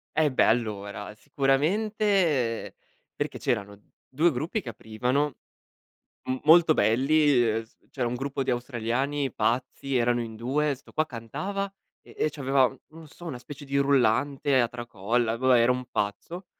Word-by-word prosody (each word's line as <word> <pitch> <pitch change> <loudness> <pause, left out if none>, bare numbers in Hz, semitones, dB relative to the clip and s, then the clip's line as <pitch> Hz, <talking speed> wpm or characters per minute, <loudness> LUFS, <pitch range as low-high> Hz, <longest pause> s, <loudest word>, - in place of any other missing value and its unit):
Eh 155 -2 +3
beh, - - +3
allora, 105 -3 -1
sicuramente 150 - +1 0.4
perché - - -3
c'erano 100 0 -2 0.3
2 160 +6 +2
gruppi 155 - -2
che 125 - -7
aprivano, 125 +7 -1 0.9
m 130 0 -1
molto 160 +1 +7
belli, 140 +3 +3
ehm, 110 +1 0
s 110 - -25 0.2
c'era 125 -3 -1
un 120 - -2
gruppo 135 +2 -3
di 130 - 0
australiani 125 +3 -1
pazzi, 125 +4 -1
erano 120 0 +2
in 115 -1 -6
2, 140 +6 0
'sto 130 - -15
qua 155 - +1
cantava 155 - -4 0.3
e - - -17
e - - +1
c'aveva, 135 -3 +2
non 155 +5 -14
lo 160 - -12
so, 165 +3 -14
una 140 -7 -5
specie 145 +3 -10
di 140 0 -1
rullante 140 0 +2
a 120 - +3
tracolla, 115 0 -1
boh, 130 +1 +2
vabbè 125 - +6
era 120 +2 +4
un 125 0 -5
pazzo, 165 - -3
130 Hz, 160 wpm, -27 LUFS, 115-150 Hz, 0.9 s, molto